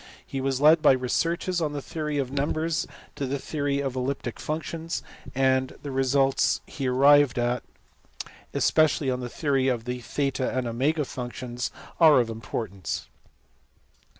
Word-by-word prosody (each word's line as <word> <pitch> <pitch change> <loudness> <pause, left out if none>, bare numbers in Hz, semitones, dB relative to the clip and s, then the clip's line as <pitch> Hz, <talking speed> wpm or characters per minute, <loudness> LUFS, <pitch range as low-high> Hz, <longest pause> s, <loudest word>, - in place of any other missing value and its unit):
He 135 - -4
was 135 -1 0
led 155 +3 +6
by 150 - +7
his 130 - -2
researches 170 +7 0
on 150 -2 -1
the 145 - -3
theory 150 -2 -3
of 135 -2 -1
numbers 155 +4 -1 0.3
to 140 - -3
the 140 +2 -1
theory 140 0 -2
of 135 -2 -3
elliptic 130 -2 -3
functions, 160 +2 -4 0.3
and 130 0 +1
the 145 - -5
results 135 +1 +2
he 135 -2 -4
arrived 140 +1 +5
at, 120 +1 0 0.9
especially 150 -3 +2
on 125 - -2
the 125 -1 -5
theory 135 -1 0
of 120 -3 0
the 125 0 -3
theta 130 +1 -2
and 130 - 0
omega 140 +6 0
functions, 125 -1 -5 0.3
are 155 -5 +7
of 115 -2 0
importance. 110 -4 -5
135 Hz, 150 wpm, -26 LUFS, 125-150 Hz, 0.9 s, by